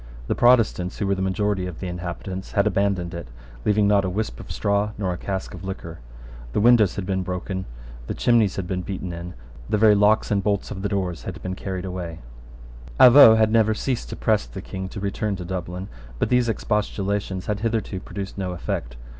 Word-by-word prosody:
The - - 0
Protestants, 115 -7 +3
who 105 - -1
were 100 - +2
the 95 - -2
majority 95 0 0
of 90 -3 -8
the - - -5
inhabitants, 90 +1 -5
had 100 -1 +3
abandoned 100 -4 0
it, 85 -4 -6 0.4
leaving 105 0 +3
not 100 -1 +4
a 95 - -1
wisp 90 - -3
of - - -9
straw 100 +1 0
nor 95 -3 -1
a - - -5
cask 95 -1 -4
of 90 - -9
liquor. 95 -3 -6 0.5
The - - +1
windows 110 -3 +5
had 100 - -3
been 95 0 -1
broken: 95 +1 -4 0.4
the - - -3
chimneys 115 -5 +3
had 95 - -3
been 90 0 -2
beaten 90 -1 -5
in: 85 0 -7 0.3
the - - +2
very 110 0 +6
locks 105 +2 +3
and 100 -1 +2
bolts 100 -1 -1
of 95 - -5
the 100 - -1
doors 95 -4 -2
had - - -6
been 95 - -3
carried 95 -1 -5
away, 90 -3 -5 0.8
Avaux 125 -3 +9
had 110 -1 +3
never 110 -1 +3
ceased 125 +1 -2
to - - -5
press 110 -2 +1
the 95 - -8
King 95 0 -6
to 100 - -7
return 100 +1 -2
to 90 -2 -6
Dublin; 90 +1 -5 0.3
but - - 0
these 125 -1 +3
expostulations 100 -3 -1
had 105 -1 -2
hitherto 110 -3 -2
produced 100 +1 -7
no 90 -2 -2
effect. 65 -7 -4
100 Hz, 205 wpm, -23 LUFS, 90-105 Hz, 0.8 s, Avaux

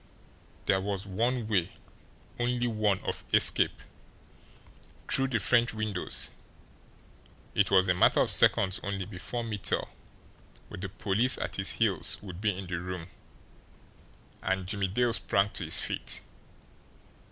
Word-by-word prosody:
There 95 - +2
was 100 0 -4
one 115 +4 -1
way, 95 -6 +1 0.7
only 120 0 0
one, 105 -4 0
of - - -4
escape - - +4 1.2
through 135 - +4
the 130 -3 0
French 120 +2 +2
windows! 110 -4 -2 1.2
It 100 - +2
was 95 -1 +4
a 90 - +3
matter 90 - +3
of - - +1
seconds 95 0 +4
only 100 -1 -4
before 105 +5 -5
Mittel, 105 -3 -2 0.8
with - - -9
the 100 - -4
police 105 +6 +2
at - - -4
his 95 0 +2
heels, 100 -7 +1
would 95 -2 -9
be 105 - +2
in 95 - -6
the 90 -1 -4
room 90 -1 -6 1.3
and 95 -1 -1
Jimmie 100 0 -1
Dale 120 +5 0
sprang 100 -2 +1
to - - -4
his - - +3
feet. - - -2
100 Hz, 135 wpm, -29 LUFS, 95-115 Hz, 1.3 s, escape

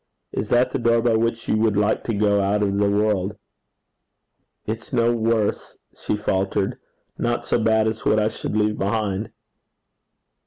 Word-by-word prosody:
Is 105 - -3
that 125 +1 +3
the - - -2
door 115 -1 +3
by 120 -2 +3
which 115 0 -1
you 110 - +2
would 110 -2 +2
like 105 +1 +1
to 115 - -1
go 100 -1 +2
out 100 +2 +1
of 100 -1 0
the 100 0 +3
world?' 105 -1 0 1.3
'It's 110 +1 -5
no 115 0 +2
worse,' 115 -2 -1 0.2
she 105 - -2
faltered, 95 -1 -1 0.2
' - - -48
not 120 0 -1
so - - +1
bad 110 -1 +2
as 110 0 -3
what 110 - +3
I 105 - +2
should 110 - -4
leave 105 0 +1
behind.' 100 0 -1
110 Hz, 170 wpm, -22 LUFS, 105-115 Hz, 1.3 s, that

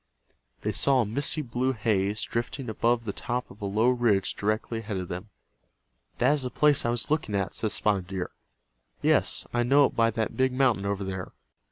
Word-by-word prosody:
They - - -1
saw 135 -2 +3
a - - 0
misty 140 +8 0
blue 130 +1 -1
haze 105 -2 0
drifting 120 +2 -3
above 115 +1 +1
the 100 - -3
top 125 +1 -3
of 105 - -15
a - - -3
low 110 +5 +2
ridge 115 -6 +2
directly 110 +2 -1
ahead 105 -3 -4
of 90 -1 -5
them. 90 +4 -6 0.9
"That 125 +4 +4
is 150 - 0
the 125 - -2
place 150 0 +3
I - - +1
was 120 +4 +1
looking 150 -9 0
at," 100 -1 -1
said 110 - -1
Spotted 100 -4 0
Deer. 95 -1 -4 0.7
"Yes, - - +2
I 120 - +2
know 140 +4 +5
it - - -2
by 115 0 +4
that 110 -1 -2
big 130 0 +2
mountain 125 -7 +2
over 100 0 -1
there." 95 -1 -5
115 Hz, 200 wpm, -27 LUFS, 100-125 Hz, 0.9 s, know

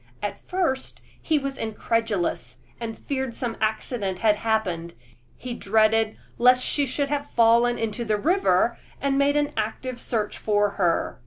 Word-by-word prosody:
At 205 - -3
first 340 -8 -2 0.2
he 315 - +1
was 275 -1 -3
incredulous, 210 - -1 0.2
and 225 -1 -5
feared 265 -4 -3
some 235 -3 -2
accident 215 -3 -1
had 210 +1 +3
happened: 185 -7 -1 0.4
he 250 -1 -6
dreaded 220 0 +2 0.2
lest 250 +1 +5
she 285 -2 +2
should 280 +2 -1
have 285 0 -2
fallen 235 +1 +4
into 225 +1 -2
the 215 -2 0
river, 355 - +2 0.2
and 275 -1 0
made 285 +1 +3
an 290 0 0
active 240 +3 -3
search 215 -3 -2
for 205 -1 +2
her. 175 -4 0
230 Hz, 150 wpm, -25 LUFS, 210-265 Hz, 0.4 s, lest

